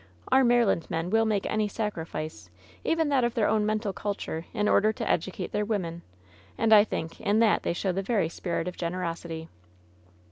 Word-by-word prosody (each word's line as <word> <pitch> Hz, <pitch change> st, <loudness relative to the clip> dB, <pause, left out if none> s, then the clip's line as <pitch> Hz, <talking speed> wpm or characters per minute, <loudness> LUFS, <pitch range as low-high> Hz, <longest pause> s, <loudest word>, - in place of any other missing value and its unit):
Our 265 Hz, +1 st, +6 dB
Maryland 235 Hz, -8 st, +3 dB
men 165 Hz, +2 st, -2 dB
will 225 Hz, +1 st, +4 dB
make 210 Hz, -3 st, 0 dB
any 215 Hz, -1 st, 0 dB
sacrifice, 160 Hz, -, -5 dB, 0.3 s
even 325 Hz, -2 st, +1 dB
that 270 Hz, -3 st, +3 dB
of 240 Hz, 0 st, 0 dB
their 225 Hz, -3 st, +2 dB
own 215 Hz, -1 st, +2 dB
mental 215 Hz, -2 st, -1 dB
culture, 195 Hz, -5 st, -4 dB
in 210 Hz, -3 st, 0 dB
order 215 Hz, +1 st, +4 dB
to -, -, -5 dB
educate 185 Hz, +2 st, -1 dB
their 210 Hz, -, 0 dB
women, 180 Hz, -6 st, -2 dB, 0.6 s
and 225 Hz, -1 st, +4 dB
I 210 Hz, -1 st, +9 dB
think 165 Hz, -6 st, -5 dB
in 205 Hz, +1 st, +2 dB
that 225 Hz, -2 st, +4 dB
they -, -, -1 dB
show 185 Hz, +2 st, -1 dB
the 190 Hz, +2 st, -1 dB
very 200 Hz, -4 st, +1 dB
spirit 170 Hz, +1 st, -3 dB
of 180 Hz, -, -4 dB
generosity.' 170 Hz, -2 st, -4 dB
205 Hz, 185 wpm, -27 LUFS, 170-220 Hz, 0.6 s, I